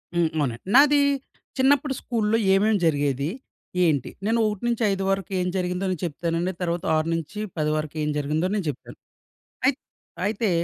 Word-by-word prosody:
హ్మ్, 170 -2 +3
అవునండి. 125 -5 -1
నాది 290 +1 +7 0.6
చిన్నప్పుడు 275 +1 +3
స్కూల్లో 225 -2 0 0.2
ఏమేం 210 +2 +3
జరిగేది? 145 -2 +1 0.6
ఏంటి? 145 -6 +1 0.2
నేను 230 +1 +2
1-5 210 -2 0
వరకు 195 -1 -1
ఏం 180 - 0
జరిగిందో 180 +1 -1
నేను 185 -2 -3
చెప్తానండి. 170 +3 -1
తర్వాత 170 +1 -1
6-10 165 +1 -2
వరకు 155 0 -3
ఏం 150 - 0
జరిగిందో 155 +5 0
నేను 200 -5 -1
చెప్తాను. 135 - -8 0.7
అయిత్ 270 +1 +3 0.5
అయితే 215 -1 0
180 Hz, 135 wpm, -24 LUFS, 155-220 Hz, 0.7 s, నాది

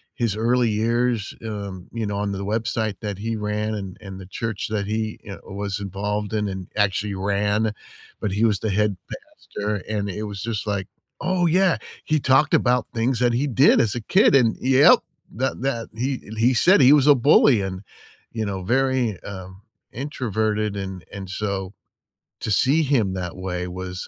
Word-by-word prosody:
his 115 -6 0
early 120 +2 +2
years, 115 0 0
um, 100 -4 -6
you 115 -1 -2
know, 100 -1 -3
on 100 0 -1
the 100 0 -4
website 110 0 -1
that 105 -3 -4
he 115 +2 -2
ran 105 0 -2
and 95 -3 -6
and 95 -1 -8
the 95 - -9
church 110 +2 -4
that 105 -2 -2
he, 110 0 -2
you 100 - -8
know, - - -10
was 100 +1 -3
involved 105 +2 -3
in, 105 -1 0
and 95 -2 -5
actually 105 0 0
ran, 105 +3 0 0.5
but 105 - -2
he 105 +3 0
was 105 -3 +2
the 110 - -2
head 105 -1 +1 0.6
pastor, 105 +1 0
and 105 -2 -2
it 105 +3 -4
was 100 -2 -6
just 110 -1 -3
like, 100 -2 -2 0.3
oh, 180 0 +1
yeah, 180 +2 +3 0.3
he 155 0 +1
talked 135 +2 +3
about 125 0 +2
things 115 +2 0
that 120 -1 +2
he 125 +5 +1
did 135 +3 +5
as 110 -2 0
a 120 - -3
kid 185 - +4
and 120 -5 +3
yep. 135 +2 +6 0.3
That 130 +2 -3
that 120 -4 -2
he 125 +4 -2
and 110 +1 -9
he 120 +3 +4
said 185 +11 +5
he 135 +2 +7
was 145 -3 +5
a 145 - +8
bully 130 -2 +5
and, 95 -1 -4 0.5
you 110 -1 -3
know, 95 -2 -4
very, 125 -2 +1
um, 95 -1 -9 0.3
introverted, 110 -6 -2
and 95 -2 -5
and 95 -2 -7
so, 95 -1 -3 0.7
to - - -2
see 135 +10 +3
him 120 -10 +1
that 90 -2 -4
way 90 -1 -3
was 90 0 -6
105 Hz, 190 wpm, -23 LUFS, 100-120 Hz, 0.7 s, a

